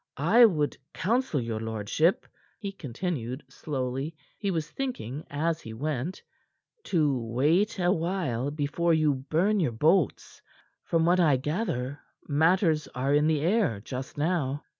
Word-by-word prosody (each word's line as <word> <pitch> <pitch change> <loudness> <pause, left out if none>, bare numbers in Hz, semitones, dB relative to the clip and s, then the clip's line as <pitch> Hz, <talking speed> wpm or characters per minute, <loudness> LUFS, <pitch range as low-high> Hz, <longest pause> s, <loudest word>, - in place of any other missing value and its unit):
I 205 - +6
would 155 -9 +1 0.2
counsel 230 - +1
your 115 -2 -3
lordship," 110 - 0 0.3
he 200 -3 -5
continued 140 -5 -4
slowly 135 +1 -4 0.2
he 200 - -1
was 165 -4 -1
thinking 160 - -4
as 160 +3 -1
he 110 0 -8
went 150 +6 -3 0.6
"to 150 -6 +2
wait 145 - +1
a 180 -1 +2
while 165 -8 -1
before 150 +3 +1
you 155 -2 +3
burn 160 +10 +1
your 150 -10 +1
boats. 155 +7 +1 0.4
From 165 -1 +2
what 175 +2 +4
I 150 -6 +4
gather, 145 - -2 0.3
matters 160 +1 +2
are 135 +3 0
in 150 +1 +4
the 155 -2 +2
air 175 - +2
just 130 +6 -7
now." 145 -3 0
155 Hz, 140 wpm, -28 LUFS, 130-175 Hz, 0.6 s, I